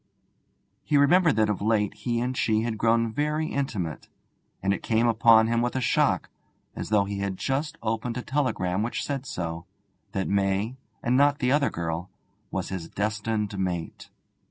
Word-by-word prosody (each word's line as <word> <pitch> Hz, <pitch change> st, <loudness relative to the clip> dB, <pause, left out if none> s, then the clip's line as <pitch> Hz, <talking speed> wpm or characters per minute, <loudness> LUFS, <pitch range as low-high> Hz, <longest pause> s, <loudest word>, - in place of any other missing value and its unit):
He 150 Hz, -, +2 dB
remembered 160 Hz, +2 st, +5 dB
that 110 Hz, -1 st, +3 dB
of 105 Hz, -2 st, -2 dB
late 105 Hz, -1 st, +1 dB
he 120 Hz, -2 st, -2 dB
and 125 Hz, +1 st, -1 dB
she 110 Hz, -3 st, +2 dB
had 115 Hz, -2 st, -3 dB
grown 115 Hz, 0 st, +2 dB
very 150 Hz, +3 st, 0 dB
intimate; 105 Hz, -, -3 dB, 0.5 s
and 100 Hz, 0 st, +2 dB
it -, -, -4 dB
came 115 Hz, +1 st, +1 dB
upon 115 Hz, -1 st, +6 dB
him 115 Hz, +1 st, +1 dB
with 120 Hz, +1 st, -1 dB
a -, -, +1 dB
shock, 125 Hz, -, +1 dB, 0.4 s
as -, -, -5 dB
though 105 Hz, -2 st, +3 dB
he 100 Hz, 0 st, -4 dB
had 100 Hz, -1 st, -2 dB
just 150 Hz, -, -2 dB
opened 115 Hz, +2 st, -2 dB
a 125 Hz, -, -4 dB
telegram 105 Hz, -10 st, 0 dB
which 115 Hz, +3 st, -2 dB
said 140 Hz, -2 st, -3 dB
so, 85 Hz, -3 st, -4 dB, 0.5 s
that 95 Hz, -3 st, -1 dB
May, 100 Hz, +4 st, 0 dB, 0.3 s
and 120 Hz, +2 st, +2 dB
not 145 Hz, +2 st, +4 dB
the 125 Hz, -2 st, +1 dB
other 145 Hz, 0 st, +3 dB
girl, 85 Hz, +1 st, -4 dB, 0.4 s
was 95 Hz, -1 st, -3 dB
his 90 Hz, -4 st, -5 dB
destined 105 Hz, 0 st, -2 dB
mate. 90 Hz, -3 st, -3 dB
110 Hz, 175 wpm, -26 LUFS, 100-130 Hz, 0.5 s, upon